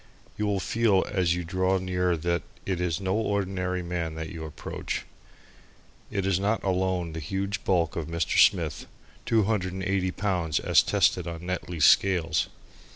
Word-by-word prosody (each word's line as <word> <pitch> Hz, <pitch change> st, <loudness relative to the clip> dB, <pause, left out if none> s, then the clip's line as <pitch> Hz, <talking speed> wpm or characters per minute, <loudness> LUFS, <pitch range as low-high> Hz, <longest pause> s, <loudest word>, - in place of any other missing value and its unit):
You 105 Hz, -, -1 dB
will 100 Hz, -1 st, +1 dB
feel 105 Hz, -1 st, +2 dB
as 90 Hz, -4 st, +1 dB
you 90 Hz, -, -3 dB
draw 95 Hz, +3 st, +1 dB
near 90 Hz, -1 st, 0 dB
that 85 Hz, +1 st, 0 dB, 0.2 s
it 95 Hz, -2 st, -1 dB
is 85 Hz, -3 st, 0 dB
no 95 Hz, -1 st, -1 dB
ordinary 95 Hz, -4 st, -1 dB
man 85 Hz, -2 st, -3 dB
that 80 Hz, 0 st, -5 dB
you 80 Hz, -1 st, -7 dB
approach. 80 Hz, -, -5 dB, 1.0 s
It 100 Hz, -2 st, -2 dB
is 95 Hz, -2 st, +2 dB
not 105 Hz, +3 st, 0 dB
alone 95 Hz, -3 st, 0 dB
the 80 Hz, -, -4 dB
huge 100 Hz, +6 st, -3 dB
bulk 85 Hz, -4 st, +1 dB
of 80 Hz, -3 st, -3 dB
Mr. 85 Hz, 0 st, 0 dB
Smith -, -, +1 dB, 0.4 s
(two 110 Hz, -2 st, +4 dB
hundred 95 Hz, -3 st, -1 dB
and 95 Hz, 0 st, -4 dB
eighty 95 Hz, -1 st, 0 dB
pounds 90 Hz, -6 st, -1 dB
as -, -, +4 dB
tested 90 Hz, -2 st, +2 dB
on 85 Hz, 0 st, -6 dB
Netley's 90 Hz, -3 st, 0 dB
scales). 85 Hz, -5 st, +4 dB
90 Hz, 165 wpm, -27 LUFS, 85-95 Hz, 1.0 s, two